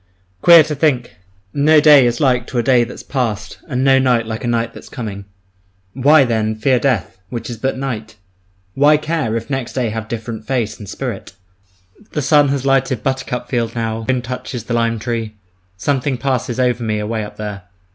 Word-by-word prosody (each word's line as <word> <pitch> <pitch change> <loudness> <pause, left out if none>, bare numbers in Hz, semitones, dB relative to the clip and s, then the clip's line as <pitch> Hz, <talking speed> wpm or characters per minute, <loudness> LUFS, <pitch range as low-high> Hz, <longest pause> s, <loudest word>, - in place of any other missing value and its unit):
Queer 170 -2 +8
to 155 0 -4
think, 130 - 0 0.4
no 150 +2 +5
day 145 -4 +7
is 120 0 -1
like 125 -3 +2
to 125 - -5
a 120 - +2
day 125 0 +4
that's 120 - -8
past 105 -6 -3
and 125 -1 -1
no 135 -1 +5
night 125 -3 +2
like 110 +1 -5
a - - -2
night 115 -1 -1
that's - - -12
coming! 100 -4 -6 0.7
Why, 140 +3 +5
then, 110 -2 0
fear 125 +4 +2
death, 110 -8 -1
which 120 0 -5
is 115 - -6
but 130 +3 -2
night? 120 -6 -5 0.6
Why 145 +4 +5
care, 155 -7 -1
if 115 - -6
next 135 -3 -3
day 125 -3 -1
have 110 0 -5
different 115 -1 -6
face 120 -5 -1
and 105 -3 -9
spirit? 120 -7 -5 0.8
The 150 - -1
sun 145 +1 +4
has 135 -1 -1
lighted 135 -3 +1
buttercup 130 -2 -2
field 115 -2 -2
now, 115 -1 -2
the 130 +4 0
wind 125 -1 -2
touches 125 -1 -5
the 115 - -4
lime 115 -1 +1
tree. 110 -1 -4 0.4
Something 135 +4 -1
passes 130 -2 -2
over 125 -1 +1
me 110 -1 -1
away 110 +1 -2
up 105 - -10
there. 105 -3 -6
120 Hz, 195 wpm, -18 LUFS, 110-135 Hz, 0.8 s, Queer